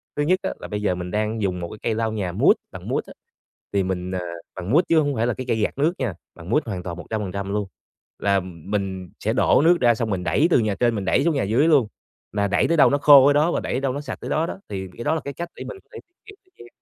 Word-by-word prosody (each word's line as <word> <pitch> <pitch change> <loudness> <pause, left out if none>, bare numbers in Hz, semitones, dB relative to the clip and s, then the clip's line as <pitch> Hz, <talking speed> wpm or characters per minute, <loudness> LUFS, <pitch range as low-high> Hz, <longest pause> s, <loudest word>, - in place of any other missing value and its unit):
Thứ 145 - 0
nhất 185 +5 +2
á, - - -2
là - - -7
bây 105 0 -4
giờ 95 -3 +1
mình 90 0 -6
đang 110 +1 -1
dùng 95 -3 -1
một 85 -1 -5
cái 110 - -9
cây 110 - -1
lau 110 0 -1
nhà 95 -5 -2
mút, - - +5 0.2
bằng - - -9
mút - - -1
á, - - -11 0.6
thì 100 - +2
mình, 90 0 -3
à, 95 - -2 0.4
bằng 90 +4 -5
mút 155 +7 +6
chứ 165 -1 +5
hông 145 -2 0
phải 115 0 0
là 120 - +1
cái 130 - -6
cây 115 - +1
gạt 110 - -1
nước 155 +5 +2
nha, 120 -7 -1 0.2
bằng 85 +2 -11
mút 150 +7 +2
hoàn 95 -6 -5
toàn 85 -1 -5
100% 100 0 -4
luôn. 105 -2 -1 0.5
Là, 100 -1 +2
ừm, 90 -1 -5
mình 95 -3 -2 0.2
sẽ - - +2
đổ - - +4
nước 175 +1 +5
ra 120 -1 +5
xong 115 0 -2
mình 95 -3 -2
đẩy 155 - +2
từ - - +5
nhà 105 -3 0
trên 120 +1 +1
mình 100 -2 -3
đẩy 115 - +2
xuống 165 -2 +1
nhà 135 - +1
dưới 120 +10 +2
luôn, 140 -9 +4 0.4
là 100 -1 0
đẩy 100 - +2
tới 165 - +1
đâu 145 - +7
nó 140 - +2
khô 145 -2 +8
ở 145 - +5
đó 150 +4 +3
và - - 0
đẩy 125 - -2
đâu 135 -1 -1
nó 145 - -4
sạch 150 - -6
tới - - -6
đó 160 - +1
đó. - - -6
Thì 95 -2 -4
cái 120 - -5
đó 160 - +1
là 160 - -2
cái 140 - -4
cách 170 +3 -6
để - - -7
mình 460 - -7
có - - -42
thể 450 - -7 0.3
tiết 420 -2 -13 0.2
kiệm - - -13
110 Hz, 305 wpm, -23 LUFS, 95-145 Hz, 0.6 s, khô